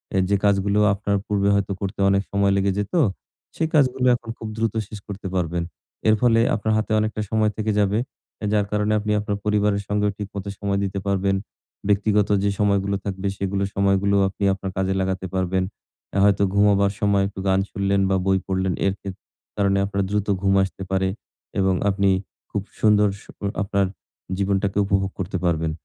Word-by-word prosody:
এ - - +3
যে 100 - +3
কাজগুলো 100 0 +2
আপনার 100 0 -1
পূর্বে 100 -1 +1
হয়তো 100 0 0
করতে 100 +1 -4
অনেক 100 0 +3
সময় 100 0 +2
লেগে 100 0 +2
যেত, 105 0 -3 0.6
সেই 160 - 0
কাজগুলো 130 -3 +3
এখন 115 - -9
খুব 110 - -7
দ্রুত 115 -2 0
শেষ 105 -1 -8
করতে 100 -1 -6
পারবেন। 85 -1 0 0.5
এর 110 - +6
ফলে 115 -2 +4 0.2
আপনার 110 +1 -1
হাতে 110 0 -2
অনেকটা 110 0 -1
সময় 110 -1 +2
থেকে 110 0 0
যাবে, 100 0 +2 0.5
এ - - -1
যার 105 -1 +2
কারণে 105 0 +1
আপনি 105 0 -2
আপনার 105 -1 -2
পরিবারের 105 -1 +1
সঙ্গেও 105 0 +1
ঠিক 105 - -4
মতো 100 0 -4
সময় 100 -1 0
দিতে 100 0 -2
পারবেন, 100 0 +1 0.5
ব্যক্তিগত 105 0 +2
যে 100 - +2
সময়গুলো 100 -1 +2
থাকবে, 95 0 -3
সেগুলো 100 0 -1
সময়গুলো 100 0 +2
আপনি 100 - -7
আপনার 95 0 -5
কাজে 95 0 +1
লাগাতে 95 0 -2
পারবেন। 95 0 +1 0.5
অ্যা 100 - 0
হয়তো 100 0 +4
ঘুমাবার 100 -1 +4
সময় 100 -2 +2
একটু 100 - -9
গান 95 0 +3
শুনলেন 100 0 +1
বা 95 - +2
বই 95 0 +3
পড়লেন। 95 -1 0
এর 100 - +2
খেত 95 -1 -6 0.4
কারণে 100 -1 +2
আপনার 100 0 -1
দ্রুত 105 0 -1
ঘুম 95 -1 +2
আসতে 95 0 -5
পারে 95 0 +1 0.5
এবং 95 -1 +3 0.2
আপনি 100 0 +2 0.4
খুব 100 - -1 0.2
সুন্দর 105 -1 +5 0.2
সো - - -14 0.3
আপনার 100 0 +1 0.5
জীবনটাকে 100 0 0
উপভোগ 95 0 0
করতে 95 +1 -2
পারবেন। 80 -2 +1
100 Hz, 180 wpm, -23 LUFS, 95-105 Hz, 0.6 s, এর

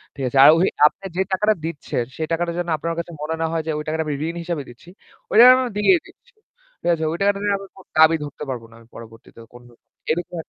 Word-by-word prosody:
ঠিক 135 - -6
আছে? 135 - -2
আর - - +9
ওই 185 - +3 0.2
আপনে 195 +5 -8
যে - - +2
টাকাটা 210 +3 +2
দিচ্ছেন 150 -6 -3
সেই 160 -1 -3
টাকাটা 170 +1 -1
যেন 175 - -3
আপনার 165 +2 -4
কাছে 170 0 -6
মনে 160 +2 -3
না - - +1
হয় 165 -1 -2
যে - - 0
ওই 150 - -4
টাকাটা 160 +1 -1
আমি 145 - -2
ঋণ 170 - -5
হিসাবে 165 -5 -4
দিচ্ছি। 120 +8 -16 0.4
ওই - - +2
টাকাটা 255 0 +7
দিয়েই 345 - +4
দিচ্ছি, 485 0 -23 0.5
ঠিক - - -6
আছে? 160 -1 -3
ওই 170 - -3
টাকাটা 200 0 +2
নিয়ে 205 -1 +1
আবার 195 0 -12
কোন 190 - -15
দাবি 160 +1 +6
ধরতে 145 +1 -8
পারবো 120 -3 -5
না - - -19
আমি 115 - -20
পরবর্তীতে 115 0 -14
কোনরকম। 120 -1 -16 0.3
এরকম 175 +2 -3
165 Hz, 240 wpm, -21 LUFS, 145-190 Hz, 0.5 s, আর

